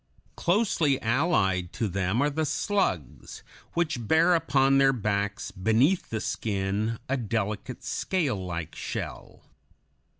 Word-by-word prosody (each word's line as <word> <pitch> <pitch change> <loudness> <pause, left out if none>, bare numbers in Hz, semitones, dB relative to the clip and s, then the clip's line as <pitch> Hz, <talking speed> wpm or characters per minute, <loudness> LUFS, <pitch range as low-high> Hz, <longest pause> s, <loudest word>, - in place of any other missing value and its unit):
Closely 170 - +2
allied 110 - +1
to 115 - -1
them 100 +6 0
are 145 - +2
the 160 +2 -1
slugs, 150 - -2 0.3
which 155 -10 -1
bear 160 +5 +5
upon 135 -4 +3
their 135 0 +5
backs, 105 -3 -2
beneath 115 - +2
the 110 - -2
skin, 105 +2 -2
a 135 - 0
delicate, 110 -3 -3
scale 140 - -1
like 85 -3 -5
shell. - - -6
115 Hz, 120 wpm, -27 LUFS, 100-150 Hz, 0.3 s, bear